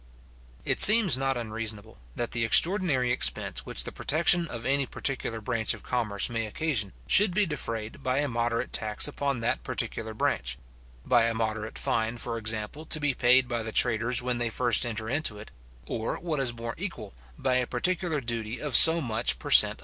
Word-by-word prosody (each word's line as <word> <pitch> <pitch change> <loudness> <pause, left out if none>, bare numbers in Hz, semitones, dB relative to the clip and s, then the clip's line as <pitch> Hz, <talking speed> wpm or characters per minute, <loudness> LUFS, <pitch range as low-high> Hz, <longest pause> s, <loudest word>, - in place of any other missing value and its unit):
It - - +1
seems 210 - +10
not 135 0 -2
unreasonable, 110 -2 -6 0.2
that 120 - -4
the 120 -1 -1
extraordinary 145 - +3
expense - - +1
which - - -2
the - - -7
protection 170 +3 +1
of 115 -6 -8
any 140 0 0
particular 120 -5 -3
branch 115 -1 -2
of - - -16
commerce 110 -5 -2
may 115 -2 -4
occasion, 110 -5 -3
should 195 -2 +3
be 210 0 +2
defrayed 115 - -6
by 130 +1 -2
a 145 +1 0
moderate 120 0 -3
tax 105 +3 +2
upon 140 -4 -3
that 115 - -2
particular 110 -1 -5
branch; 65 - -2 0.5
by 120 -2 +3
a 115 0 -2
moderate 110 -1 -4
fine, 115 +1 -2
for 115 -1 -4
example, 110 +6 -3
to 155 - +1
be 145 -2 -1
paid 125 +1 +3
by 120 -2 -3
the 110 0 -6
traders 120 +2 +1
when 125 -1 -2
they 120 -1 -1
first 120 0 +1
enter 110 -1 -5
into 135 -4 -2
it; 105 - -12 0.3
or, 110 0 -4
what 160 -4 -4
is 130 -3 -1
more 115 0 -7
equal, - - -6 0.2
by 130 -1 0
a 125 -1 -1
particular 180 -4 -1
duty 115 -2 -5
of 145 -5 -2
so 165 +1 +7
much 115 - 0
per - - -8
cent. - - +6
120 Hz, 190 wpm, -26 LUFS, 110-140 Hz, 0.5 s, seems